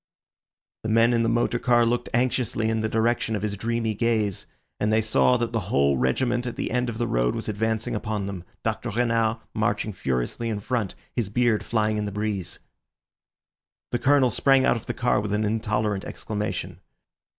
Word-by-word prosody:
The 110 Hz, -, -4 dB
men 115 Hz, +2 st, +4 dB
in 115 Hz, -, +3 dB
the 115 Hz, -, +2 dB
motor 120 Hz, +1 st, +1 dB
car 120 Hz, -1 st, +4 dB
looked 120 Hz, +1 st, 0 dB
anxiously 120 Hz, -2 st, 0 dB
in 110 Hz, 0 st, 0 dB
the 110 Hz, -, -1 dB
direction 115 Hz, 0 st, +1 dB
of 105 Hz, -, -3 dB
his 105 Hz, -1 st, -1 dB
dreamy 115 Hz, +1 st, -1 dB
gaze, 110 Hz, -3 st, 0 dB, 0.3 s
and 105 Hz, -, +1 dB
they 110 Hz, -, +4 dB
saw 110 Hz, +3 st, +3 dB
that 120 Hz, -1 st, -2 dB
the 110 Hz, -5 st, -3 dB
whole 70 Hz, -3 st, +3 dB
regiment 120 Hz, -, 0 dB
at 120 Hz, -, -4 dB
the -, -, -3 dB
end 125 Hz, +1 st, 0 dB
of 115 Hz, -, -5 dB
the 120 Hz, -, 0 dB
road -, -, +1 dB
was -, -, -4 dB
advancing 110 Hz, +1 st, -1 dB
upon 105 Hz, -2 st, -2 dB
them, 95 Hz, -3 st, -5 dB, 0.2 s
Dr. 110 Hz, +2 st, -2 dB
Renard 115 Hz, 0 st, +1 dB, 0.2 s
marching 105 Hz, 0 st, 0 dB
furiously 65 Hz, -, -2 dB
in 105 Hz, -2 st, -2 dB
front, 110 Hz, -2 st, -2 dB, 0.2 s
his 115 Hz, -6 st, -1 dB
beard 120 Hz, 0 st, +2 dB
flying 110 Hz, -2 st, 0 dB
in 105 Hz, -, -2 dB
the 100 Hz, -, -3 dB
breeze. 105 Hz, -3 st, -3 dB, 1.3 s
The 120 Hz, -, 0 dB
Colonel 135 Hz, -2 st, +4 dB
sprang 135 Hz, -1 st, +4 dB
out -, -, +4 dB
of 115 Hz, -, -7 dB
the -, -, -3 dB
car 120 Hz, -4 st, +2 dB
with 105 Hz, 0 st, -3 dB
an 105 Hz, +1 st, +1 dB
intolerant 105 Hz, -2 st, 0 dB
exclamation. 105 Hz, -1 st, -4 dB
110 Hz, 190 wpm, -25 LUFS, 105-120 Hz, 1.3 s, men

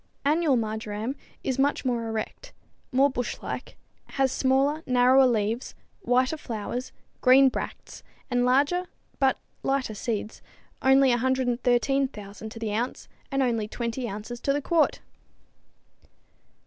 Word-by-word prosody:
Annual 300 Hz, -2 st, +3 dB
marjoram 220 Hz, +2 st, -3 dB, 0.3 s
is 265 Hz, 0 st, -1 dB
much 280 Hz, 0 st, +1 dB
more 235 Hz, -2 st, 0 dB
erect, 225 Hz, -, -5 dB, 0.4 s
more 270 Hz, +2 st, +5 dB
bush 250 Hz, -3 st, -3 dB
like, -, -, -6 dB, 0.4 s
has 270 Hz, -1 st, +3 dB
smaller, 275 Hz, +4 st, +2 dB
narrower 255 Hz, +1 st, +5 dB
leaves, 225 Hz, +1 st, -1 dB, 0.3 s
whiter 255 Hz, +5 st, +2 dB
flowers, 240 Hz, 0 st, -5 dB, 0.3 s
green 265 Hz, +1 st, +7 dB
bracts -, -, -6 dB, 0.3 s
and 245 Hz, -1 st, +1 dB
larger, 285 Hz, +9 st, +2 dB, 0.3 s
but 265 Hz, -2 st, +3 dB, 0.2 s
lighter 270 Hz, -4 st, 0 dB
seeds 215 Hz, 0 st, -4 dB, 0.4 s
only 265 Hz, 0 st, +5 dB
113,000 245 Hz, -3 st, 0 dB
to 220 Hz, -, -11 dB
the 220 Hz, -2 st, -3 dB
ounce 240 Hz, +4 st, -3 dB, 0.2 s
and 275 Hz, 0 st, +2 dB
only 230 Hz, -4 st, 0 dB
20 235 Hz, +2 st, -3 dB
ounces 215 Hz, +4 st, -6 dB
to 275 Hz, -, 0 dB
the 285 Hz, -, +1 dB
quart! 320 Hz, +2 st, +1 dB
255 Hz, 120 wpm, -26 LUFS, 230-270 Hz, 0.4 s, green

